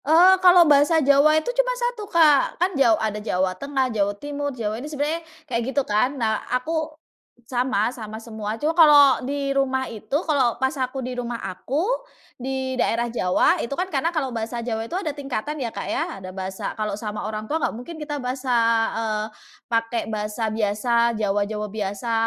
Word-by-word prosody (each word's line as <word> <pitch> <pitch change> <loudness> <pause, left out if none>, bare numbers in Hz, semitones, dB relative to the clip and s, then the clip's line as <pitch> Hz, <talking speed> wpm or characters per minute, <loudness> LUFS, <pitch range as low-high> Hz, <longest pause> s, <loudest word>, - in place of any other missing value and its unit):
Eee, 340 +5 +7
kalau 360 -1 +7
bahasa 295 +2 +5
Jawa 290 +1 +5
itu 315 +11 -1
cuma - - +1
1 480 -4 -3
Kak 310 -7 +4
kan 365 +2 +1
ja 250 -7 +4
ada 210 -1 -2
Jawa 185 -3 0
Tengah, 270 +6 -1
Jawa 205 -1 0
Timur, 290 +3 -4
Jawa 225 -4 -4
ini 295 - -7
sebenarnya 300 +3 -2 0.2
kayak 240 -4 -2
gitu 265 +3 -1
kan 250 +7 +1
nah 220 -3 0
aku, 310 +4 -2 0.5
sama 245 -4 +1
sama 220 -4 -8
semua 220 -2 -5
cuma 305 +2 +2
kalau 290 -5 +7
di 280 +1 -2
rumah 265 -1 0
itu 220 +1 -10 0.2
kalau 260 -6 +2
pas 265 +3 0
aku 260 0 -2
di 250 0 -5
rumah 240 -1 -4
aku 265 - -3 0.6
di 260 0 -3
daerah 235 -1 0
Jawa 185 -6 +2
itu 235 - -5
kan 360 +6 -2
karena 325 +2 -1
kalau 295 -5 -1
bahasa 235 0 -4
Jawa 225 -1 -3
itu 230 - -10
ada 365 -3 -1
tingkatan 285 0 -4
ya 240 -5 -4
Kak - - -5
ya - - 0 0.2
ada 185 - -7
bahasa 190 +3 -5
kalau 215 -1 -2
sama 210 0 -5
orang 215 0 -5
tua 315 - +1
nggak 320 - -1
mungkin 250 +9 -8
kita 295 -2 -5
bahasa, 255 0 -2 0.4
eee, 215 -1 -1 0.4
pakai 230 0 -1
bahasa 210 +1 -2
biasa 230 +2 +1
Jawa-Jawa 210 0 -1
biasa 210 +2 -3
255 Hz, 185 wpm, -23 LUFS, 220-290 Hz, 0.6 s, Eee